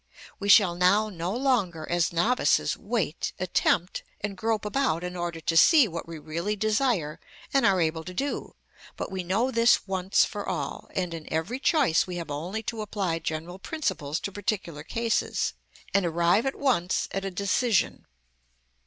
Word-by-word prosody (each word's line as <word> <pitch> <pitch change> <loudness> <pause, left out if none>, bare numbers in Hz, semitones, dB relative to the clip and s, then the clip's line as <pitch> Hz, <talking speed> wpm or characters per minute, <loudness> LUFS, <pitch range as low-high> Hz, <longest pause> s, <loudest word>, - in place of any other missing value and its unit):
We 200 +1 -3
shall 200 -4 +7
now 190 +5 +3
no 175 -2 -4
longer, 215 - 0
as 175 0 +1
novices, 220 +10 +2
wait, 205 -7 -2
attempt, 180 0 +1 0.2
and 205 -1 -4
grope 220 +1 -1
about 210 - 0
in 180 0 -5
order 175 -1 -3
to 165 - -1
see 285 - +7
what 170 -3 -6
we 165 -1 -7
really 170 +7 -3
desire 215 - 0 0.3
and 275 - +4
are 190 -2 +3
able 160 -1 0
to 180 - -7
do, 280 +6 -3 0.4
but - - -5
we 190 -1 -3
know 215 +9 0
this 230 -3 +3
once 190 0 +2
for 205 -2 -5
all, 180 - -4
and 180 -2 -1
in 160 -2 -8
every 165 +11 -2
choice 275 - +3
we 180 - -5
have 170 -3 -5
only 180 +10 -4
to 225 0 -4
apply 195 -5 -2
general 165 +4 -5
principles 185 - -2
to 200 - -4
particular 185 -6 -3
cases, 230 +6 -1 0.4
and 200 - +3
arrive 175 +7 +2
at 270 - -2
once 235 -11 +1
at 195 - -3
a 195 - -2
decision. 200 +4 0
190 Hz, 170 wpm, -27 LUFS, 170-220 Hz, 0.4 s, shall